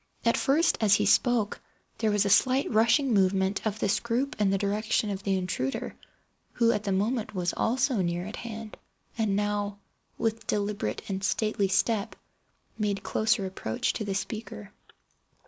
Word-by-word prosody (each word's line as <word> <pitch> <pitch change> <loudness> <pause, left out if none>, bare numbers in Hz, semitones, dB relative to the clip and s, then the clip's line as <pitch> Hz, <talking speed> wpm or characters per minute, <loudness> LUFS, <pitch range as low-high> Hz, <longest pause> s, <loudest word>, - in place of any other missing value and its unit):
At 230 - +4
first, 310 +5 +2
as 205 -2 +5
he - - +1
spoke, 240 -5 +2 0.4
there 220 - +1
was 205 -1 +2
a - - +1
slight 260 +5 +4
rushing 235 +4 +3
movement 190 0 +2
of 215 0 -2
this 205 -1 +1
group 245 +5 -1
in 200 - +3
the 195 - +2
direction 210 +2 0
of 195 -1 -4
the 195 -1 0
intruder, 175 -8 -3 0.6
who 230 -1 +3
at 210 -1 -2
the 200 - 0
moment 215 +3 -1
was 180 -1 -1
also 255 +2 +1
near 175 -1 -1
at 210 - -7
hand, 225 -2 -7 0.4
and 220 -4 0
now, 205 0 -1 0.4
with 225 0 -2
deliberate 205 0 -2
and 195 -1 -3
stately 210 0 +1
step, 200 +2 0 0.6
made 205 -2 -1
closer 220 -2 +1
approach 185 -12 -2
to - - -3
the 200 -2 -3
speaker. 195 - -5
210 Hz, 165 wpm, -28 LUFS, 195-225 Hz, 0.6 s, as